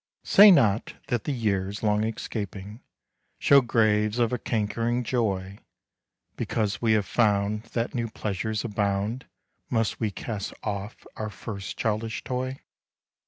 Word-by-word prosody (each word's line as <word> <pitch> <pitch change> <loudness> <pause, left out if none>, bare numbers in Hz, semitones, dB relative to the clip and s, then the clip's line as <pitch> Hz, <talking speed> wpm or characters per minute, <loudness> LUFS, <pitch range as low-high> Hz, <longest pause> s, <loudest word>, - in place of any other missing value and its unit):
Say 205 +2 +8
not 110 - +4
that 120 -3 -1
the - - -1
years 100 -5 -1
long 105 0 +2
escaping, 105 -1 -5 0.6
Show 140 -1 +6
graves 110 -2 +2
of 120 -1 +2
a 125 - -1
cankering 115 +3 -1
joy. 100 -5 -1 0.8
Because 105 -2 -1
we 115 -2 +3
have 105 -2 +2
found 105 -1 +1
that 115 0 -1
new 120 -2 -2
pleasures 110 +1 -3
abound, 105 +3 -1 0.4
Must 115 -2 0
we 110 - 0
cast 100 0 -5
off 100 0 -5
our 110 0 -3
first 100 -2 -7
childish 110 0 -2
toy? 130 +1 -3
110 Hz, 130 wpm, -26 LUFS, 105-115 Hz, 0.8 s, Say